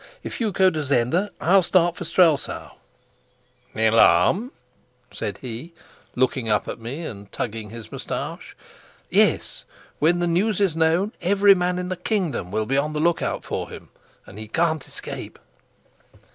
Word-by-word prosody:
If - - -6
you'll 225 - +1
go 190 0 +4
to 155 -3 -2
Zenda, 140 +9 +1
I'll 190 +3 +4
start 175 -1 +2
for - - -6
Strelsau." 165 -6 +2 1.0
"The 110 - +1
alarm?" 115 - +4 0.6
said 100 -1 -4
he, 130 +7 -7 0.4
looking 125 -2 0
up 105 - +1
at - - -5
me 135 +9 -6
and 100 -5 -9
tugging 110 -2 -4
his 115 0 -10
moustache. - - -6 0.6
"Yes: - - +2 0.4
when 165 +4 +3
the 175 - 0
news 185 +5 +1
is 195 -6 +2
known, 165 +6 +2
every 200 +3 +5
man 180 -1 0
in 180 0 -3
the 185 - -3
kingdom 180 - -2
will 110 +3 -1
be 135 +4 0
on 150 +2 0
the 150 - -2
lookout 170 +2 0
for - - -4
him, - - -11 0.4
and 100 - -11
he 110 - -7
can't 160 +3 0
escape." - - -8
160 Hz, 160 wpm, -23 LUFS, 115-180 Hz, 1.0 s, every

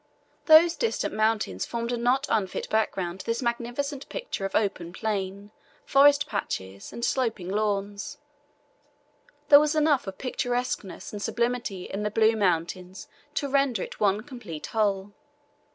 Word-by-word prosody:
Those 330 +2 +8
distant 460 - -1
mountains 215 - 0
formed 235 0 -3
a - - +1
not 250 +4 +2
unfit 195 -4 -1
background 190 -5 0
to - - -8
this 230 +2 -1
magnificent 245 +4 -3
picture - - -4
of 195 - -4
open 180 -5 -1
plain, 200 -1 -3 0.3
forest 285 +1 +5
patches, 95 +1 -5
and 235 - -3
sloping 225 -8 -1
lawns 205 +3 -2 1.3
there 285 - +10
was 300 +1 +1
enough 300 -7 +2
of 190 - -6
picturesqueness 245 -6 -3
and 205 - -5
sublimity 235 -5 -1
in 195 - -5
the 210 - 0
blue 220 +1 +3
mountains 185 -1 -1 0.3
to 285 - 0
render 275 -3 +1
it - - -9
one 205 0 +2
complete 240 - -8
whole. 205 -3 0
220 Hz, 140 wpm, -27 LUFS, 195-255 Hz, 1.3 s, there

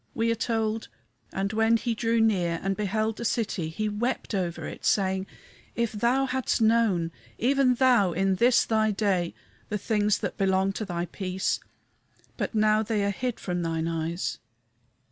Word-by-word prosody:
We 230 0 +1
are - - +3
told 225 -1 -1 0.4
"And 195 +2 -2
when 225 +1 +3
he 235 +1 -1
drew 230 +1 +1
near 180 -7 +2
and 195 0 0
beheld 215 +2 -1
the - - -5
city, 210 -8 -1
he 215 +7 -2
wept 230 +4 -2
over 180 -4 -2
it, - - -8
saying, 190 -1 +1 0.5
If 235 -1 0
thou 240 +5 +1
hadst 260 -1 0
known, 220 -7 +3 0.3
even 260 +1 +3
thou 245 -7 +4
in 190 +2 +1
this 240 +3 +4
thy 220 -1 +2
day, 195 -4 0 0.3
the 210 - -1
things 210 0 +1
that - - -5
belong 190 0 +2
to 215 - -4
thy 175 -2 -2
peace! 185 +1 -2 0.8
but - - -3
now 215 0 +4
they 220 -1 0
are 200 - +1
hid 245 +3 -3
from 180 -1 -2
thine 165 -1 -1
eyes." 165 +1 -2
210 Hz, 165 wpm, -27 LUFS, 190-230 Hz, 0.8 s, thou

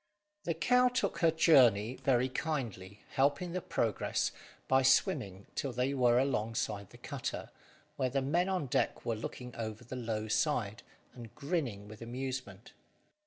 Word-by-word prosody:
The 170 - 0
cow 250 +9 +4
took 250 0 -1
to - - +2
her - - +5
journey 125 - +5
very 130 -1 +2
kindly, 115 - -4
helping 145 +6 +1
the 185 +1 -2
progress 115 -9 0 0.4
by 130 0 +4
swimming 130 - +2
till 135 - -2
they 125 +3 0
were 120 -3 +4
alongside 110 -6 -1
the - - -14
cutter, - - -5 0.5
where 130 - +1
the 135 +1 0
men 170 +7 +1
on 185 -6 0
deck 125 - -1
were 115 - 0
looking 125 +3 -7
over 110 0 -5
the 120 +2 -7
low 110 -3 -3
side, 110 -3 0 0.3
and 120 -3 -11
grinning 140 - -2
with 110 +1 -11
amusement. 125 -4 -5
125 Hz, 155 wpm, -32 LUFS, 110-145 Hz, 0.5 s, her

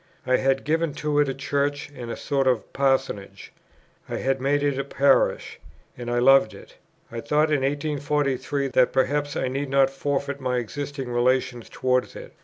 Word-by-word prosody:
I 130 0 +3
had 135 0 +1
given 160 -1 0
to 150 -1 0
it 145 -2 +3
a - - -1
Church 145 +1 -2
and 120 -1 -7
a - - -4
sort 135 -2 0
of 125 -4 0
Parsonage; 135 -7 -1 0.6
I - - -3
had 135 0 -1
made 145 +2 +1
it 140 -2 0
a - - 0
Parish, 140 0 +1 0.4
and 120 -1 -6
I 120 - 0
loved 130 -2 +5
it; - - -14 0.4
I 115 0 -5
thought 150 +3 +1
in 145 -3 +2
1843 145 -1 -1
that 125 -1 +3
perhaps 145 +2 0
I - - -1
need 135 +2 -3
not 135 0 +3
forfeit 140 0 -3
my 125 -1 -1
existing 135 +2 -5
relations 120 0 0
towards 125 0 0
it. - - -10
135 Hz, 180 wpm, -24 LUFS, 130-145 Hz, 0.6 s, loved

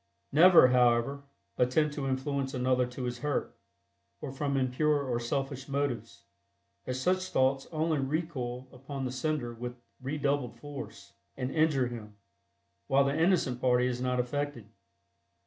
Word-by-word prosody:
Never, 165 -2 +8
however, 125 +3 +2 0.3
attempt 145 +5 +2
to 140 -2 -3
influence 135 +1 -2
another 125 0 +2
to 125 +1 -7
his 120 0 -3
hurt, 145 +1 -2 0.6
or - - -5
from 140 0 -1
impure 140 +3 +1
or 125 -3 -1
selfish 135 +2 -3
motives, 140 -3 -3 0.6
as 130 0 -2
such 185 +6 +1
thoughts 135 -3 +1
only 155 -1 0
recoil 135 -4 -3
upon 135 +1 -6
the 125 - -2
sender 130 -2 -2
with 120 +1 -7 0.2
redoubled 140 -3 -1
force, 140 -9 -9 0.2
and 130 0 -2
injure 155 -4 +2
him, 110 -4 -7 0.7
while 140 +1 +4
the 140 +1 0
innocent 160 -7 +2
party 125 -1 +3
is 125 -1 -2
not 125 0 0
affected. 145 -2 -2
135 Hz, 140 wpm, -30 LUFS, 125-145 Hz, 0.7 s, Never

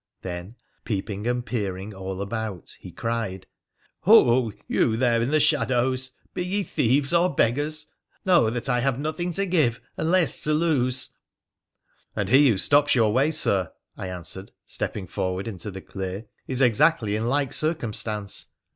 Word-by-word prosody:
Then, 90 +4 -6 0.3
peeping 100 0 -3
and 125 0 -1
peering 100 -4 -3
all 95 0 -5
about, 110 -4 -5
he - - -10
cried, 110 -5 -3 0.3
' - - -39
Ho! 130 - +6 0.2
you 110 - +1
there 120 -1 +2
in 120 - 0
the 155 +1 +3
shadows! 130 -2 +2 0.2
Be 180 - -2
ye 195 +3 -1
thieves 140 -1 +1
or 175 +1 +3
beggars, 145 +6 0 0.4
know 175 -11 +5
that 120 +2 -4
I 125 -2 +2
have 130 0 0
nothing 155 +5 -2
to 195 +4 0
give 155 -11 +2 0.2
and 160 - -1
less 180 -2 +2
to 155 - +2
lose! 130 -6 +1 0.4
' - - -58
' - - -39
And - - -2
he 135 +2 +6
who 110 - +2
stops 145 +8 +4
your 110 -4 +3
way, 135 +5 +3
Sir,' 100 - +1 0.2
I - - -6
answered, 90 +2 -6
stepping 100 - -2
forward 95 +2 -3
into 105 -2 -5
the 95 -1 -8
clear, 95 +3 -6
' - - -43
is 130 0 -1
exactly 125 -3 +3
in 110 +2 -1
like 140 0 0
circumstance.' 110 - -2
120 Hz, 170 wpm, -25 LUFS, 105-145 Hz, 0.4 s, Ho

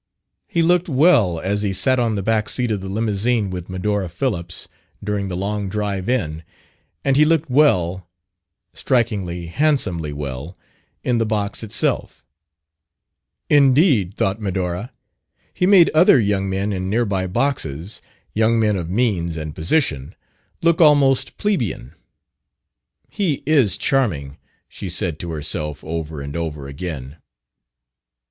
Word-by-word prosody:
He 170 - +1
looked 175 +1 +2
well 130 - +4
as 100 +4 -1
he 100 -2 -1
sat 125 +8 +2
on 115 -3 +1
the 100 - -2
back 110 0 +1
seat 125 -2 0
of 105 -3 -1
the 95 - -6
limousine 105 0 0
with 90 -1 -6
Medora 95 0 -2
Phillips, 85 -3 -3 0.4
during 100 -1 -2
the 90 -2 -4
long 100 +1 -2
drive 100 0 -2
in; 80 -11 -1 0.6
and 135 - +3
he 150 - +6
looked 160 -2 +1
well 95 - +2 0.6
strikingly, 100 -9 -1
handsomely 90 - 0
well 70 +3 -6 0.5
in 120 -2 +1
the 115 - +1
box 105 -2 -2
itself. 110 -2 -2 1.2
Indeed, 135 - +4
thought 95 +3 0
Medora, 95 +1 -3 0.6
he 180 - +1
made 185 -4 +6
other 155 -3 +6
young 100 -3 0
men 100 +2 -1
in 95 0 -3
nearby 100 -4 0
boxes 90 - -2 0.3
young 115 +1 +2
men 105 -2 +2
of 85 -2 -4
"means" 90 -6 0
and 75 -1 -5
"position" 80 - -1 0.5
look 170 0 +3
almost 145 -4 +4
plebian. 175 - -2 1.1
"He 170 -10 -2
is 140 -9 +3
charming," 80 - -1 0.3
she 95 - -7
said 85 -3 -1
to 85 - -5
herself, 75 -1 -4
over 80 -2 -5
and 70 +1 -7
over 75 -4 -4
again. 70 -1 -6
100 Hz, 135 wpm, -20 LUFS, 85-125 Hz, 1.2 s, he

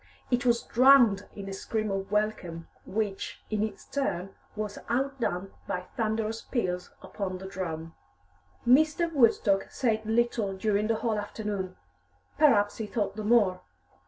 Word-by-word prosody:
It 245 +1 +2
was 235 -1 +3
drowned 240 -5 +5
in 200 -1 -7
a 195 - -5
scream 215 +2 -2
of 195 0 -3
welcome, 200 -6 -1 0.2
which, 205 -1 -3
in 215 -1 0
its 215 0 -3
turn, 195 -9 -2 0.2
was 210 -1 -4
outdone 240 -7 -1
by 180 - -2
thunderous 220 0 -1
peals 180 -8 -2
upon 190 -3 -4
the 190 - -9
drum. 165 -4 -5 0.7
Mr. 310 +6 +4
Woodstock 225 -7 +3
said 220 -4 0
little 225 -3 0
during 210 +1 +1
the 225 - +2
whole 220 -2 +1
afternoon. 205 -3 -4 0.6
Perhaps 210 -9 +4
he 220 - -4
thought 205 -2 -2
the 215 - -4
more. 210 -5 +3
215 Hz, 140 wpm, -28 LUFS, 195-235 Hz, 0.7 s, drowned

